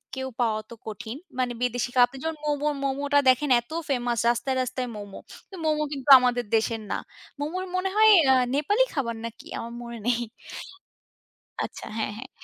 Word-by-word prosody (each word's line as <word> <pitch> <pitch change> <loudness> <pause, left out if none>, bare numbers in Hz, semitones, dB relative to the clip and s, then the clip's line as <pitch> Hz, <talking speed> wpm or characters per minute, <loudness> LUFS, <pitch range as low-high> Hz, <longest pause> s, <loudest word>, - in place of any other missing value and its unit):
কেউ 265 0 -3
পাওয়াও 220 -2 +1
তো - - -7
কঠিন। 220 +3 -6 0.2
মানে 250 -1 0
বিদেশী 245 0 0
খাবার, 245 -1 +7
আপনি 270 - -11
যেমন 320 -1 -2
মোমো, 295 0 0
মোমোটা 280 +1 +1
দেখেন 260 +3 +3
এত 240 - -24 0.2
ফেমাস 240 -3 0
রাস্তায়, 240 +3 0
রাস্তায় 255 0 -3
মোমো। 205 -1 -8 0.3
তো - - -8
মোমো 305 -1 +2
কিন্তু 275 0 -5
আমাদের 245 -1 +1
দেশের 225 0 0
না। - - 0 0.4
মোমোর 345 +6 -3
মনে 370 +1 0
হয় 435 0 +7 0.2
আ - - +5 0.2
নেপালি 405 - +3
খাবার 235 -5 -1
নাকি? 230 0 -9
আমার 235 +1 -6
মনে 235 0 -7
নেই। 240 -1 +2 1.4
আচ্ছা, - - -9
হ্যাঁ, 215 -2 -2
হ্যাঁ। 260 +4 -9
255 Hz, 175 wpm, -26 LUFS, 235-290 Hz, 1.4 s, খাবার